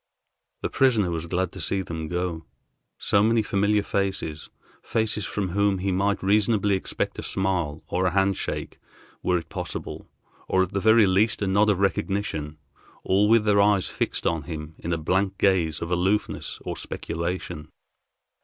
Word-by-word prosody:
The - - 0
prisoner 115 -9 +3
was 85 0 -3
glad 90 +1 -1
to - - -8
see 95 -1 -1
them 80 -2 -5
go. 90 -1 -3 0.5
So 100 - +2
many 110 +1 +3
familiar 105 +1 +1
faces, 95 -7 -2 0.3
faces 110 -3 -1
from 100 -3 -2
whom 100 +1 +2
he 95 +1 -1
might 100 +2 0
reasonably 105 +1 +3
expect 95 - -2
a - - -3
smile, 90 -6 -2
or 90 +1 0
a - - +3
handshake, 95 +1 -1 0.4
were 90 -1 +2
it 80 - -7
possible, - - -6 0.4
or 95 - +3
at 95 - -5
the 100 - +1
very 110 +2 +6
least 100 +2 +2
a - - 0
nod 100 +3 +3
of 100 - +3
recognition, 95 -6 -1 0.5
all 100 +3 +3
with 115 -1 +5
their 100 -1 +4
eyes 100 -2 +3
fixed - - -3
on 80 -4 0
him, 80 -2 -6
in 85 - -4
a 85 - +1
blank 95 +4 0
gaze 85 -6 +2
of 85 - -5
aloofness 95 +4 0
or - - -4
speculation. 85 -2 -4
95 Hz, 165 wpm, -25 LUFS, 85-100 Hz, 0.5 s, very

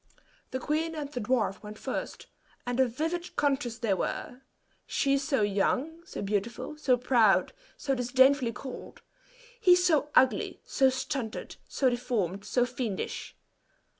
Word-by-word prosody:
The 260 - -3
queen 315 +4 -1
and 290 -2 -5
the 250 - -4
dwarf 210 -3 0
went 210 0 -9
first, - - -5 0.4
and 245 +1 -2
a 260 - +5
vivid 325 +8 -3
contrast 265 -4 0
they 210 -4 +3
were 245 +6 -3 0.5
she 275 -1 +2
so 275 -5 +1
young, 260 +11 0
so 390 - -5
beautiful, 215 +8 -2
so 270 -4 +2
proud, 225 -7 +3 0.2
so 275 - -1
disdainfully 260 0 +3
cold; 260 +1 -9 0.6
he 365 -5 +7
so 320 -5 +2
ugly, 260 0 +3
so 265 -2 +3
stunted, 260 -3 -4
so 270 - +1
deformed, 210 -6 -2
so 245 -1 +2
fiendish. 245 -6 -4
255 Hz, 135 wpm, -29 LUFS, 230-285 Hz, 0.6 s, he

